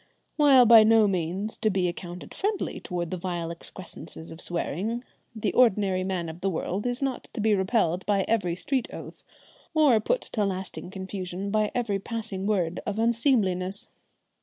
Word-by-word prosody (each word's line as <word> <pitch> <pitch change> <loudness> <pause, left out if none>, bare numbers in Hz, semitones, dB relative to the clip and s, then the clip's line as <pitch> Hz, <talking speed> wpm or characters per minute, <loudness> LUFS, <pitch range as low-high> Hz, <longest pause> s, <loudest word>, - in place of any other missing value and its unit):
While 275 -5 +7
by 230 -1 +9
no 220 -1 +5
means 185 +3 -2
to 220 - +1
be 190 -3 +1
accounted 175 0 -7
friendly 410 +1 -2
towards 175 -2 -4
the 185 - -2
vile 170 -2 -3
excrescences 165 -2 -9
of 160 - -9
swearing, 195 - -2 0.3
the 215 -2 -1
ordinary 200 -6 +3
man 185 -3 -2
of 160 +2 -8
the 195 - +1
world 190 +5 -2
is 245 +2 -2
not 265 -2 -2
to - - -5
be 215 0 +3
repelled 190 -3 +1
by 200 -2 +3
every 190 -7 +1
street 260 +7 -1
oath, - - -9 0.5
or 290 -8 +5
put - - 0
to 215 - -2
lasting 190 -2 -4
confusion 190 0 -5
by 215 0 +2
every 220 -5 0
passing 210 -2 -4
word 180 -5 0
of 210 0 -3
unseemliness. 220 -5 +1
195 Hz, 165 wpm, -27 LUFS, 180-225 Hz, 0.5 s, by